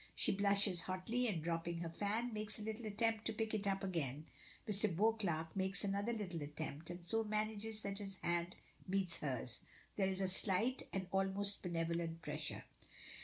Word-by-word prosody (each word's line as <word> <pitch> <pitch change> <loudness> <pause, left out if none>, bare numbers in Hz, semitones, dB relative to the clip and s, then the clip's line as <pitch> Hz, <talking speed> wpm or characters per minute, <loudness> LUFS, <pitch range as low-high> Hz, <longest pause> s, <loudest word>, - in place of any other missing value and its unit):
She - - +3
blushes 200 -2 +3
hotly, 220 +7 0
and, 175 -8 -1
dropping 170 0 -1
her 170 - -2
fan, 215 +7 0
makes 215 0 -2
a 215 - -5
little 220 +1 -3
attempt 220 +1 +1
to 225 - +1
pick 220 0 -1
it 205 -2 0
up 195 0 +1
again. 155 -6 -1 0.4
Mr. 210 0 +4
Beauclerk 175 -5 +1
makes 190 +1 +1
another 200 +3 +1
little 190 -8 -3
attempt, 150 +1 -5
and 175 0 -6
so 225 +5 +2
manages 215 0 -1
that 200 0 -2
his 195 -2 -4
hand 170 +1 +1 0.3
meets 185 -3 +1
hers. 125 -4 -2 0.4
There 195 -2 +3
is 190 0 -1
a 190 - +2
slight, 200 +6 +1
an 190 -1 -1
almost 195 +1 +3
benevolent 165 -1 -1
pressure. - - -2
195 Hz, 170 wpm, -39 LUFS, 170-215 Hz, 0.4 s, Mr